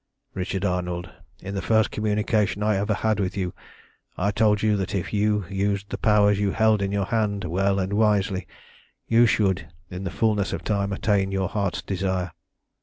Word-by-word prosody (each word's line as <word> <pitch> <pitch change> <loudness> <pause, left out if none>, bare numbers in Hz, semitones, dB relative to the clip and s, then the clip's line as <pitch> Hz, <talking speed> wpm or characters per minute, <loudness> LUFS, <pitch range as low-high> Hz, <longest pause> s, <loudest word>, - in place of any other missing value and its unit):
"Richard 95 +1 -2
Arnold, 90 -1 -2 0.3
in 100 +1 -6
the 100 - -2
first 110 -1 +2
communication 105 -1 0
I 105 0 +2
ever 105 +2 0
had 110 -1 0
with 95 0 -2
you, 90 -2 -2 0.6
I 100 +3 +1
told 105 0 +2
you 105 -1 +3
that 95 +1 -3
if 95 +1 -3
you 105 -1 +1
used 100 0 -2
the - - -2
powers 105 -2 +4
you 100 -1 0
held 110 -2 +3
in 100 0 -1
your 100 -1 0
hand 105 -2 -1
well 95 +3 +1
and 95 +1 -1
wisely, 105 -3 +1 0.6
you 115 +1 +5
should, 95 -7 +1 0.2
in 90 +1 -5
the 95 - -2
fulness 105 0 0
of - - -4
time, 100 -2 0
attain 100 -1 +1
to - - -5
your 95 -1 0
heart's 100 -4 -2
desire. 95 -2 -2
100 Hz, 185 wpm, -24 LUFS, 95-105 Hz, 0.6 s, you